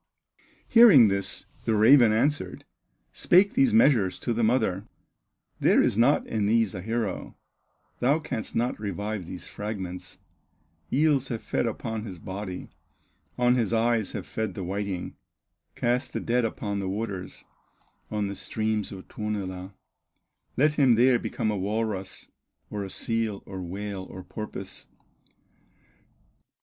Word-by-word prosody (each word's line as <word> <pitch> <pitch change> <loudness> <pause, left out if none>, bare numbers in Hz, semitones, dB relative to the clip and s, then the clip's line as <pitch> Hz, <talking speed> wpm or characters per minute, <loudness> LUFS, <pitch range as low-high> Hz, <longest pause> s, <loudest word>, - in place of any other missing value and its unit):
Hearing 205 - +8
this, 100 -1 -3 0.2
the 110 - +2
raven 115 +2 +7
answered, 145 +7 0 0.5
Spake 195 +5 +4
these 265 -1 +4
measures 130 - +4
to 120 - -1
the 115 - -1
mother: 110 -4 +1 0.7
"There - - +4
is - - +1
not 120 +6 +3
in 105 -2 -1
these 115 -2 +2
a 90 - -5
hero, 110 -1 -3 0.6
Thou 135 +5 +3
canst 150 -8 -5
not 120 0 0
revive 100 -1 -4
these 90 - -7
fragments; 95 -4 -6 0.7
Eels 145 -2 +2
have 115 -3 -4
fed - - -1
upon 110 -1 -4
his 95 -5 -7
body, 95 +1 -6 0.7
On 125 0 +4
his 120 -2 0
eyes 115 -2 +1
have - - -5
fed 110 -4 -4
the 95 - -4
whiting; 95 0 -4 0.6
Cast 120 +3 0
the - - -1
dead 120 0 +1
upon 100 -2 -3
the 95 -1 -3
waters, 100 -2 -5 0.7
On 105 -1 -1
the 100 - -3
streams 110 +1 -2
of 95 -2 -9
Tuonela, 95 -3 -5 0.8
Let 150 +3 +4
him 130 -4 +6
there 125 +1 +4
become 110 -1 -2
a - - -1
walrus, 100 -1 -3 0.4
Or 105 -1 -3
a 95 - -6
seal, 115 -1 -1
or 95 -1 -7
whale, 95 +1 -5
or 95 - -9
porpoise." 105 +4 -7
110 Hz, 135 wpm, -27 LUFS, 100-120 Hz, 0.8 s, Hearing